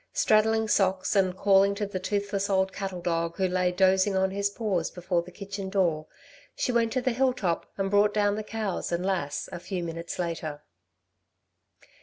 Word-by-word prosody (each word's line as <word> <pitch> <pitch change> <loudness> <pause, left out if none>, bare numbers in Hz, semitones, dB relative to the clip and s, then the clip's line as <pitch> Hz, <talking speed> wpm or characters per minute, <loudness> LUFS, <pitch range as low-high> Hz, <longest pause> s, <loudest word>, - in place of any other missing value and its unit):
Straddling 220 +1 +3
Socks, 190 -1 +1
and 190 -2 +2
calling 200 0 +4
to 205 0 -2
the 195 -2 -4
toothless 200 +1 -2
old 190 -1 +1
cattle 190 -3 -5
dog 170 -1 -1
who 190 -1 +2
lay 180 0 +1
dozing 190 +2 +3
on 190 0 +2
his 200 +1 0
paws 200 -6 -1
before 180 -1 -1
the 170 - -11
kitchen 195 +1 -6
door, 170 -6 0 0.5
she - - 0
went 230 -1 +2
to 255 - 0
the 255 - +2
hill 255 +2 +2
top 180 -9 -2
and 195 -1 -1
brought 205 +1 +4
down 205 -1 +2
the 215 - -3
cows 215 -4 -3
and 175 +1 -1
Lass 180 -7 -2
a 175 - -6
few 180 0 -4
minutes 170 0 -5
later. 160 -4 -4
195 Hz, 185 wpm, -27 LUFS, 180-205 Hz, 0.5 s, calling